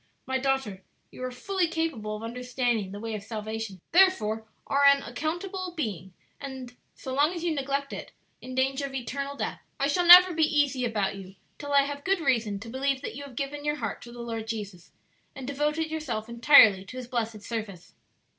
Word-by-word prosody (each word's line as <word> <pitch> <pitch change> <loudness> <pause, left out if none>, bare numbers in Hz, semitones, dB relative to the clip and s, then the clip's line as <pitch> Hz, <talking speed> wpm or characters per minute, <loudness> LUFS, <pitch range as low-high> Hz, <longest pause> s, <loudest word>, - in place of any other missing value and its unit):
"My 260 0 -1
daughter, 265 -8 -1 0.3
you - - -9
are 255 - -2
fully 365 +8 -1
capable 310 -11 -2
of 215 - -8
understanding 240 -3 -2
the 200 - -7
way 225 +1 -5
of 210 - -4
salvation, 220 -2 -5
therefore 225 - +3 0.2
are 280 +1 +1
an 280 0 +6
accountable 350 +7 -4
being, 190 - -4 0.3
and, 265 -3 -8 0.2
so 260 - -6
long 295 +6 +2
as 340 - -5
you 340 -2 +1
neglect 280 -1 -2
it, - - -7 0.3
in 255 0 -8
danger 270 +2 0
of 270 - -9
eternal 275 +3 -4
death. - - -4 0.2
I 275 - +2
shall 345 +5 +1
never 360 +1 +10
be 320 - -1 0.2
easy 270 -3 +1
about 205 -4 -1
you 190 0 -11 0.2
till 285 -1 -6
I 280 0 +6
have 285 0 -5
good 390 -1 +1
reason 230 -9 0
to 230 - -9
believe 265 +3 -1
that - - -5
you 285 - -7
have 270 -3 -12
given 285 +3 -4
your 295 0 0
heart - - -4
to 235 - -11
the 240 0 -9
Lord 225 -1 -5
Jesus, 205 -6 -6 0.4
and 265 - -7
devoted 300 +3 -1
yourself 265 -9 -3
entirely 230 -5 +6
to 255 +6 -10
His 250 -2 -6
blessed 225 -4 -3
service." 210 -7 -6
260 Hz, 200 wpm, -27 LUFS, 225-285 Hz, 0.4 s, never